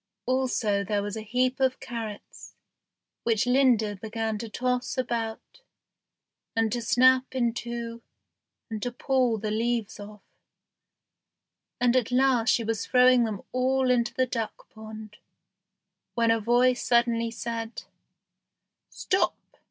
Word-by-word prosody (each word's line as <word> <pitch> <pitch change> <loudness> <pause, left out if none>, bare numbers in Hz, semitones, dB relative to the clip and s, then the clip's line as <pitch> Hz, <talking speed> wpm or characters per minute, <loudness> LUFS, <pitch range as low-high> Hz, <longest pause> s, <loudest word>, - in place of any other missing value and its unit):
Also 250 -6 0
there 205 +1 -1
was 205 +1 -4
a 220 - -5
heap 250 +4 0
of 260 -1 +1
carrots, 225 -4 -8 0.7
which 230 +1 +1
Linda 245 -5 +3
began 220 +1 -3
to 230 - -6
toss 250 +3 -2
about, 235 - -4 0.9
and 225 -1 +1
to 240 - -2
snap 255 +2 +3
in 240 -3 +1
two, 235 0 -5 0.7
and 220 -2 -5
to 245 - -2
pull 250 -2 +1
the 215 0 -3
leaves 225 -1 -1
off; 205 0 -11 1.6
and 245 0 +3
at 250 -2 +1
last 250 -2 +3
she 235 - +3
was 225 -1 -2
throwing 250 -1 +5
them 210 -4 -5
all 260 0 +1
into 240 -1 +1
the 260 - +1
duck 230 -3 -5
pond, 220 -1 -10 1.0
when 230 -1 +3
a 225 - +2
voice 245 +3 +2
suddenly 235 -1 +2
said, 230 0 -5 1.1
"Stop!" 375 - 0
235 Hz, 130 wpm, -27 LUFS, 220-250 Hz, 1.6 s, throwing